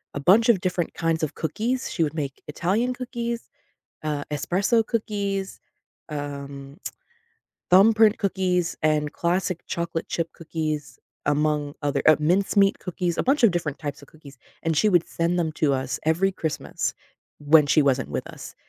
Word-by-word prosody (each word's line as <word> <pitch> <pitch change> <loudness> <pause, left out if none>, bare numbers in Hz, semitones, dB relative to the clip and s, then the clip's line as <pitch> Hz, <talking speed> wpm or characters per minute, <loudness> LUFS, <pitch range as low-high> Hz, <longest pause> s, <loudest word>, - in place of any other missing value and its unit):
a - - -2
bunch 205 +11 +5
of 205 -6 +5
different 180 -2 -1
kinds 165 -1 0
of 155 - -2
cookies. 235 - -2
She - - -2
would 150 - -1
make 140 -4 -4
Italian 205 +11 0
cookies, 235 -2 -4 0.6
uh, 150 -2 -1
espresso 190 - +1
cookies, 200 -4 -2 0.5
um, 140 -1 -6 0.9
thumbprint 215 +3 +6
cookies, 185 -3 0
and 150 -1 +1
classic 175 0 -1
chocolate 170 -1 -3
chip 165 -1 -2
cookies, 155 -3 -4 0.3
among 150 0 +1
other 145 -1 0
uh, 155 - +8
mincemeat 195 +5 +3
cookies, 180 -2 -3
a - - +2
bunch 270 0 +2
of 225 - +7
different 160 -5 -2
types 145 -2 -5
of 140 - -15
cookies, 140 -3 -15 0.3
and 165 -1 0
she 215 - +4
would 175 -4 +3
send 170 +1 -1
them 160 -2 0
to 145 -3 +1
us 130 0 -2
every 180 +5 +2
Christmas 160 -4 -3 0.5
when 150 0 +5
she 155 - +4
wasn't 135 -1 +1
with - - -3
us, - - -10
165 Hz, 155 wpm, -24 LUFS, 150-195 Hz, 0.9 s, uh